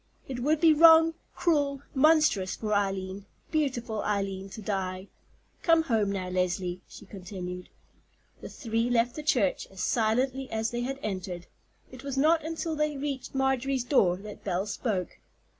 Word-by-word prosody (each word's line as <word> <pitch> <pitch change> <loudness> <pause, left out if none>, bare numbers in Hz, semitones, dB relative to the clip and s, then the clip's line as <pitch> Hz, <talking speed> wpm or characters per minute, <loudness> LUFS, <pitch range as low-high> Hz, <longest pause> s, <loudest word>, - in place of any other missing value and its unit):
It 260 -2 -5
would 295 +5 +1
be 325 -1 +6
wrong, 325 +1 +7 0.2
cruel, 285 -5 +1
monstrous 300 - +3
for 215 -1 -3
Eileen, 195 -1 -2 0.2
beautiful 245 -8 -1
Eileen, 195 -2 -2
to 205 - -9
die. 190 -2 -3 0.5
Come 330 -1 +4
home 220 -8 +1
now, 190 -2 -3
Leslie," 180 0 -1
she - - -13
continued. 180 -2 -7 0.7
The - - -7
three 230 -1 -2
left 240 0 +2
the 305 - -6
church 245 -10 +1
as 190 -1 -8
silently 255 +5 0
as 220 0 -1
they 240 0 -2
had 270 +2 -3
entered. 185 -3 -4 0.5
It 255 0 -11
was 275 -1 -4
not 315 +3 +4
until 325 0 -3
they 300 -1 -1
reached 275 -1 -4
Marjorie's 265 -1 +1
door 195 -9 +3
that 210 +2 -10
Belle 190 0 -1
spoke. 205 -3 -3
230 Hz, 155 wpm, -28 LUFS, 195-280 Hz, 0.7 s, wrong